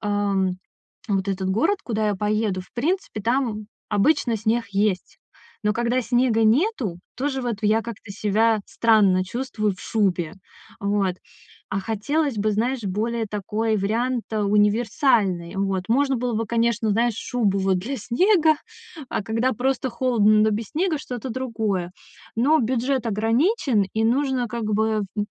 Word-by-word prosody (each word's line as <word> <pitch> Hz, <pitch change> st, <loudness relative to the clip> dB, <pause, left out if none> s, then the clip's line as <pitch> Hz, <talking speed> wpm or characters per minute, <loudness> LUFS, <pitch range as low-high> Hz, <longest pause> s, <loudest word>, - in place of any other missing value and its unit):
ам, 200 Hz, -3 st, 0 dB, 0.5 s
вот 195 Hz, -1 st, 0 dB
этот 190 Hz, -1 st, -1 dB
город, 325 Hz, -, +2 dB
куда 220 Hz, -2 st, 0 dB
я 205 Hz, -, 0 dB
поеду, 210 Hz, -1 st, 0 dB
в -, -, -22 dB
принципе, 320 Hz, -, -1 dB
там, 230 Hz, -3 st, 0 dB, 0.2 s
обычно, 225 Hz, +2 st, +2 dB
снег 225 Hz, +3 st, 0 dB
есть. 200 Hz, -2 st, -1 dB, 0.5 s
Но 210 Hz, -, +3 dB
когда 240 Hz, +2 st, +1 dB
снега 240 Hz, -1 st, +2 dB
нету, 230 Hz, -, +1 dB, 0.2 s
тоже 265 Hz, 0 st, -2 dB
вот 230 Hz, -4 st, -3 dB
в -, -, -5 dB
я 220 Hz, +2 st, +3 dB
как-то 225 Hz, -3 st, -8 dB
себя 215 Hz, +2 st, +2 dB
странно 200 Hz, -5 st, +3 dB
чувствую 225 Hz, -1 st, -2 dB
в -, -, -15 dB
шубе. 185 Hz, -6 st, 0 dB, 0.5 s
Вот, 200 Hz, -2 st, 0 dB, 0.5 s
а 195 Hz, -, -1 dB
хотелось 235 Hz, +6 st, -1 dB
бы, 215 Hz, +1 st, +1 dB
знаешь, 235 Hz, +4 st, -1 dB
более 220 Hz, +4 st, -1 dB
такой 215 Hz, +2 st, -1 dB
вариант, 230 Hz, +5 st, -1 dB
э, 215 Hz, -, -1 dB
универсальный. 205 Hz, -3 st, +2 dB
Вот, 195 Hz, -1 st, -1 dB
можно 270 Hz, +4 st, +2 dB
было 245 Hz, 0 st, -2 dB
бы, 225 Hz, +1 st, -1 dB
конечно, 230 Hz, 0 st, +1 dB
знаешь, 230 Hz, +2 st, +2 dB
шубу, 215 Hz, -5 st, 0 dB
вот, 190 Hz, -1 st, +1 dB
для 245 Hz, +10 st, -4 dB
снега, 315 Hz, -, +3 dB, 0.6 s
а -, -, -1 dB
когда 230 Hz, +4 st, 0 dB
просто 260 Hz, +2 st, -1 dB
холодно, 235 Hz, -3 st, +3 dB
но 220 Hz, -, +3 dB
без 215 Hz, +1 st, -2 dB
снега- 325 Hz, -1 st, 0 dB
что-то 250 Hz, -3 st, -6 dB
другое. 220 Hz, -8 st, -2 dB, 0.5 s
Но 290 Hz, +7 st, +4 dB
бюджет 255 Hz, +2 st, 0 dB
ограничен, 230 Hz, -, +1 dB
и 220 Hz, 0 st, +1 dB
нужно 260 Hz, +1 st, +1 dB
как 235 Hz, 0 st, -4 dB
бы, 220 Hz, +1 st, +2 dB
м 210 Hz, -2 st, -1 dB
м, 205 Hz, 0 st, -1 dB
220 Hz, 155 wpm, -23 LUFS, 205-245 Hz, 0.6 s, Но